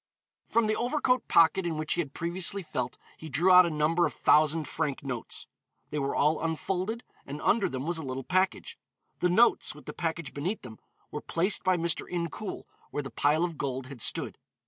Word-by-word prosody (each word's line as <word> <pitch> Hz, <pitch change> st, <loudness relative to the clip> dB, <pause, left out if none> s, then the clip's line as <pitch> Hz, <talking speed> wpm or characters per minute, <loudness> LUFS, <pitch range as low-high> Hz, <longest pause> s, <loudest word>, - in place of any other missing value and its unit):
From 230 Hz, -1 st, +2 dB
the 215 Hz, 0 st, +1 dB
overcoat 250 Hz, 0 st, +1 dB
pocket, 170 Hz, +3 st, +5 dB
in 165 Hz, -3 st, -2 dB
which 155 Hz, 0 st, -1 dB
he -, -, +1 dB
had 145 Hz, -4 st, -8 dB
previously 180 Hz, +3 st, -1 dB
felt, 125 Hz, -6 st, -4 dB, 0.2 s
he 160 Hz, -, -9 dB
drew 165 Hz, +8 st, +3 dB
out 180 Hz, -1 st, +8 dB
a -, -, -1 dB
number 160 Hz, +3 st, +2 dB
of -, -, -9 dB
thousand 155 Hz, 0 st, +3 dB
franc 150 Hz, -5 st, -3 dB
notes; 125 Hz, -4 st, -4 dB, 0.5 s
they 150 Hz, -, -1 dB
were 140 Hz, 0 st, -1 dB
all 150 Hz, +2 st, +2 dB
unfolded, 185 Hz, +7 st, -2 dB, 0.2 s
and 140 Hz, +2 st, -7 dB
under 210 Hz, -2 st, +3 dB
them 130 Hz, +1 st, -4 dB
was 170 Hz, 0 st, -1 dB
a -, -, -5 dB
little 130 Hz, 0 st, -4 dB
package. 185 Hz, +6 st, 0 dB, 0.4 s
The 180 Hz, -, +2 dB
notes, 225 Hz, -3 st, +3 dB
with 150 Hz, -, -14 dB
the -, -, -6 dB
package 165 Hz, -3 st, -3 dB
beneath 175 Hz, +10 st, -3 dB
them, 110 Hz, -4 st, -10 dB, 0.3 s
were -, -, -5 dB
placed 185 Hz, +4 st, +1 dB
by 185 Hz, -1 st, +3 dB
Mr. 170 Hz, -1 st, -1 dB
Incoul 175 Hz, +4 st, -4 dB, 0.3 s
where 145 Hz, -, -3 dB
the 135 Hz, -, -7 dB
pile 150 Hz, +3 st, +2 dB
of 170 Hz, -4 st, -3 dB
gold 135 Hz, -2 st, -3 dB
had 130 Hz, -3 st, -9 dB
stood. -, -, +1 dB
165 Hz, 200 wpm, -29 LUFS, 145-185 Hz, 0.5 s, out